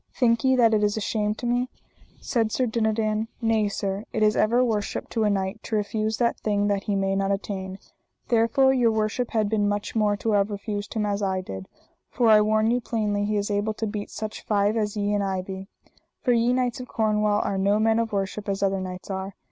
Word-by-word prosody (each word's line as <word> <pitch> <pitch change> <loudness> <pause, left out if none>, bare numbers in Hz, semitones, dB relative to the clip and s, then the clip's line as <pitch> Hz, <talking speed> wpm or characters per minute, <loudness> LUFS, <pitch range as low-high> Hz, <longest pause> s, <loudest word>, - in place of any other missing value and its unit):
Think 230 -3 +2
ye 260 0 +4
that 230 -3 +4
it 210 -1 +2
is 205 +1 +1
a - - 0
shame 210 0 -1
to 240 - -7
me? 245 +1 0 0.5
said 225 -3 0
Sir 255 - +1
Dinadan: 220 -1 0
nay, 225 -2 +2
sir, 200 0 -3
it 215 - 0
is 215 0 +4
ever 240 +4 +3
worship 210 -4 -2
to 225 -2 0
a - - +3
knight 195 +2 -2
to 220 - -3
refuse 215 +1 -1
that 235 -1 +1
thing 205 -1 0
that 200 -1 -1
he 205 - 0
may 195 0 0
not 195 0 0
attain, 190 -1 -4 0.5
there 230 -1 +4
fore 265 +3 +4
your 245 -3 +3
worship 220 +3 -1
had 215 -2 +1
been 205 -1 +1
much 205 +2 -3
more 210 -2 +2
to 220 +2 -1
have 205 0 +2
refused 205 +1 -5
him 215 -1 0
as 205 0 -1
I 190 -2 0
did; 95 - -7 0.4
for 235 -2 +2
I 215 -1 +7
warn 215 +1 +2
you 245 +1 +1
plainly 210 -3 -1
he 210 0 0
is 205 +1 -1
able 205 +1 0
to 225 - -2
beat 205 -1 -4
such 215 0 -6
five 205 0 +1
as 210 -1 -1
ye 205 0 0
and 205 -1 +1
I 190 -1 -1
be; 190 0 -7 0.6
for 250 - +2
ye 235 0 +3
knights 250 -1 0
of 250 - -7
Cornwall 210 -2 +1
are 195 - -1
no 200 +2 +3
men 220 +1 +3
of 230 -1 -1
worship 200 +1 -3
as 195 0 -1
other 195 -1 +1
knights 185 +1 -6
are. 190 0 -4
210 Hz, 235 wpm, -25 LUFS, 200-225 Hz, 0.6 s, I